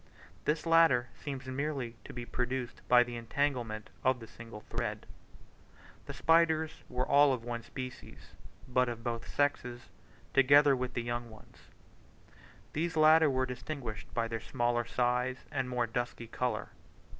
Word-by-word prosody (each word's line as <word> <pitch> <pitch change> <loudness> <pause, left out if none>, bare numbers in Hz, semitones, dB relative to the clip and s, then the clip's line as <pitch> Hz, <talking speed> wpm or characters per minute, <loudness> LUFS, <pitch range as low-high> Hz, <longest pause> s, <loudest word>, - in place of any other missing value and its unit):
This 150 +1 0
latter 165 -8 +5
seems 135 -3 -6
merely 130 -2 -3
to - - -8
be 120 -1 -6
produced 125 0 -3
by 125 0 +7
the 120 0 -7
entanglement 115 -3 -2
of 130 -1 +3
the 115 - -9
single 115 -1 -11
threads. - - -4 1.0
The - - -5
spiders 160 -1 +2
were 125 +1 -1
all 145 -1 +6
of 120 -3 -4
one 120 0 -4
species, 130 +1 -9 0.4
but 125 -1 +2
of 115 -1 -6
both 115 -1 -3
sexes, 125 -4 -1 0.4
together 140 +1 +6
with 125 -1 -4
young 120 0 -2
ones. 110 -1 -17 1.0
These 165 +2 -1
latter 155 0 +7
were 130 -1 +1
distinguished 125 -2 -6
by 115 -1 0
their 115 0 -3
smaller 120 0 0
size 125 +2 0
and 130 -1 -1
more 125 -1 0
dusky 120 0 -3
colour. 125 +2 -2
125 Hz, 145 wpm, -32 LUFS, 120-140 Hz, 1.0 s, by